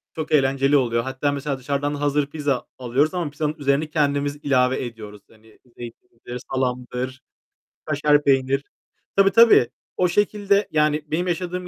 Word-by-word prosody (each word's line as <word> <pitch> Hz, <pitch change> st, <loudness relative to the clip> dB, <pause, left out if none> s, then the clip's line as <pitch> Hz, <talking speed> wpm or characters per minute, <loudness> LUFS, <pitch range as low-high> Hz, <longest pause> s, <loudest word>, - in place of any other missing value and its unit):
Çok 155 Hz, -1 st, -5 dB
eğlenceli 135 Hz, 0 st, +3 dB
oluyor. 115 Hz, -3 st, 0 dB
Hatta 135 Hz, +2 st, -2 dB
mesela 140 Hz, -1 st, -3 dB
dışarıdan 140 Hz, +2 st, -2 dB
hazır 145 Hz, 0 st, 0 dB
pizza 145 Hz, -3 st, -2 dB
alıyoruz 130 Hz, +6 st, 0 dB
ama 175 Hz, -4 st, -2 dB
pizzanın 150 Hz, +1 st, -2 dB
üzerine 145 Hz, +2 st, 0 dB
kendimiz 145 Hz, -2 st, 0 dB
ilave 130 Hz, -2 st, +1 dB
ediyoruz. 105 Hz, -3 st, -10 dB
Hani, 110 Hz, 0 st, -22 dB, 0.2 s
zeytindir, 120 Hz, +1 st, -10 dB
salamdır, 125 Hz, 0 st, -3 dB, 0.6 s
kaşar 150 Hz, 0 st, +2 dB
peynir. 135 Hz, 0 st, +2 dB, 0.5 s
Tabii, 195 Hz, 0 st, +5 dB
tabii 230 Hz, -, +6 dB, 0.3 s
o 180 Hz, -, +3 dB
şekilde. 205 Hz, +1 st, +1 dB
Yani 150 Hz, 0 st, +1 dB
benim 175 Hz, +4 st, -2 dB
yaşadığım 180 Hz, +1 st, -3 dB
145 Hz, 140 wpm, -22 LUFS, 130-155 Hz, 0.6 s, tabii